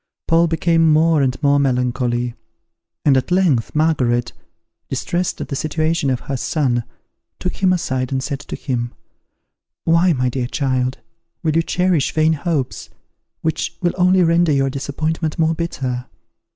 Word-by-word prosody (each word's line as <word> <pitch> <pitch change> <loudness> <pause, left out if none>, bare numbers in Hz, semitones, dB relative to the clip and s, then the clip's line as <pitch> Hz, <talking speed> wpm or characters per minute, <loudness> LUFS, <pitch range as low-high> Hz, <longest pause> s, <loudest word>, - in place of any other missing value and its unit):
Paul 165 +1 +4
became 165 0 +3
more 155 0 +4
and 130 -2 +1
more 140 0 +4
melancholy; 125 -2 0 0.7
and 140 -3 +5
at 130 - 0
length 175 -12 +2
Margaret, 130 -7 +1 0.6
distressed 175 +1 -2
at - - -5
the 140 - -2
situation 155 0 0
of 130 -2 -1
her 135 - -3
son, 125 -4 0 0.5
took 180 - -4
him 190 -1 +3
aside 130 -8 -1
and 130 -1 -1
said 140 -1 -3
to - - -7
him, 120 -3 -3 0.9
"Why, 170 +2 +4
my 125 -2 0
dear 125 -1 -2
child, 130 -1 -1 0.5
will 155 -2 +1
you 165 - +4
cherish 180 -3 +1
vain 160 0 +3
hopes, 150 -3 -2 0.5
which 165 +1 -2
will 175 -1 0
only 185 0 +4
render 170 -1 +3
your 135 -1 +2
disappointment 155 +3 -2
more 160 0 +2
bitter? 130 -7 -3
150 Hz, 150 wpm, -19 LUFS, 130-165 Hz, 0.9 s, and